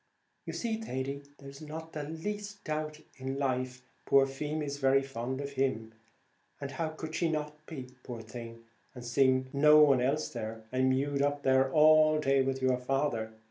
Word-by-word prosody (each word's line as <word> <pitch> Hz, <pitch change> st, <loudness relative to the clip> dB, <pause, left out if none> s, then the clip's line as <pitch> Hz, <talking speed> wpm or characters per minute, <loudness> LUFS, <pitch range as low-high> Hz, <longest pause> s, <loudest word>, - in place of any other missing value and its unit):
"You -, -, -4 dB
see, 225 Hz, -2 st, -2 dB
Thady, 140 Hz, -7 st, -4 dB, 0.2 s
there's 140 Hz, +1 st, -11 dB
not 160 Hz, +1 st, -8 dB
the 150 Hz, -, -3 dB
least 205 Hz, +7 st, -5 dB
doubt 155 Hz, -1 st, -3 dB, 0.2 s
in 135 Hz, 0 st, -4 dB
life 130 Hz, -2 st, -2 dB, 0.2 s
poor 135 Hz, -1 st, +6 dB
Feemy's 145 Hz, +1 st, -3 dB
very 135 Hz, 0 st, +4 dB
fond 130 Hz, 0 st, -4 dB
of 140 Hz, 0 st, -4 dB
him; 130 Hz, -5 st, -1 dB, 0.7 s
and 140 Hz, -1 st, -5 dB
how 160 Hz, +4 st, -2 dB
could 155 Hz, 0 st, -7 dB
she 170 Hz, 0 st, +1 dB
not 150 Hz, -1 st, -4 dB
be, 130 Hz, -6 st, -7 dB
poor 120 Hz, -3 st, -7 dB
thing, 115 Hz, 0 st, -9 dB, 0.3 s
and 125 Hz, -, -8 dB
she 120 Hz, -, -6 dB
seeing 130 Hz, 0 st, +3 dB
no 150 Hz, +2 st, +7 dB
one 135 Hz, -4 st, +5 dB
else, 140 Hz, +2 st, 0 dB
and 115 Hz, +3 st, -1 dB
mewed 140 Hz, +2 st, +1 dB
up 145 Hz, 0 st, 0 dB
there 130 Hz, 0 st, +3 dB
all 155 Hz, +1 st, +6 dB
day 135 Hz, -2 st, +3 dB
with 135 Hz, 0 st, -1 dB
your 130 Hz, -1 st, +3 dB
father? 125 Hz, -4 st, -1 dB
135 Hz, 175 wpm, -31 LUFS, 130-150 Hz, 0.7 s, no